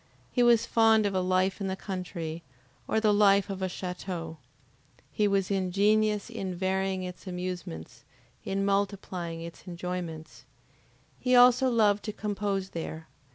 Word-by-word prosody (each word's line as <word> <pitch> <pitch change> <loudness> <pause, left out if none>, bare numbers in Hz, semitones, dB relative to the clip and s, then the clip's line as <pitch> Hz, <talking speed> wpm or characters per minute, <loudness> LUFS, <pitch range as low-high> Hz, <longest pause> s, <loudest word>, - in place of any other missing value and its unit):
He 245 - +1
was 235 -1 +5
fond 225 -2 +4
of 200 - 0
a 190 - +1
life 185 +2 +1
in 195 - -1
the 190 - -2
country, 175 -4 -5 0.5
or 220 - +1
the 215 -1 +3
life 200 -1 +4
of 195 - -5
the 190 -1 -1
chateau. 180 -3 -5 0.7
He 210 - +1
was 195 -1 +1
ingenious 205 +2 +2
in 195 -6 -5
varying 190 +1 -1
its 180 +2 -8
amusements, 180 - -6 0.4
in 195 0 -1
multiplying 195 -4 -2
its 170 +2 -10
enjoyments. 175 -3 -6 0.8
He 255 0 +2
also 250 +1 +6
loved 210 -4 +3
to 215 - -3
compose 200 -2 -2
there. 160 -1 -6
195 Hz, 145 wpm, -28 LUFS, 180-210 Hz, 0.8 s, also